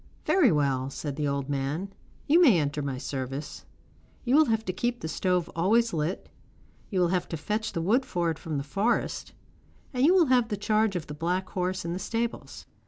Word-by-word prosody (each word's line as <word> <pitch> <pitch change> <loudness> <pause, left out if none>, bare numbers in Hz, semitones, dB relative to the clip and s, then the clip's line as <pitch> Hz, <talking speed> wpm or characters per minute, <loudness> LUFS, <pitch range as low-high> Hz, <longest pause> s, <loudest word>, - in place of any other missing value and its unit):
'Very 330 - +4
well,' 135 -3 +1
said 140 +1 -5
the 150 0 -1
old 140 -1 -2
man. 145 +8 -3 0.3
'You 330 +5 +5
may 240 - +6
enter 145 0 -1
my 140 -2 -3
service. 135 +2 -5 0.6
You 250 +2 +3
will 310 +1 +7
have 225 -3 0
to 185 - -2
keep 240 +5 -1
the - - -3
stove 180 +2 0
always 220 +7 +2
lit, 160 +3 -2 0.6
you 190 - -1
will 175 -1 +3
have 180 -1 -1
to 165 - -3
fetch 215 +7 -2
the 165 - -2
wood 235 +9 +3
for 175 -7 -1
it 160 - -6
from 155 -3 -4
the 140 - -2
forest, 200 +11 -1 0.6
and 250 0 0
you 340 +6 +6
will 355 -3 +6
have 250 -4 +3
the 210 - -2
charge 215 0 +1
of 175 - -3
the 150 - -7
black 180 +5 -2
horse 185 -1 -2
in 170 - -2
the 180 - -3
stables. 230 +4 -4
180 Hz, 210 wpm, -27 LUFS, 150-225 Hz, 0.6 s, will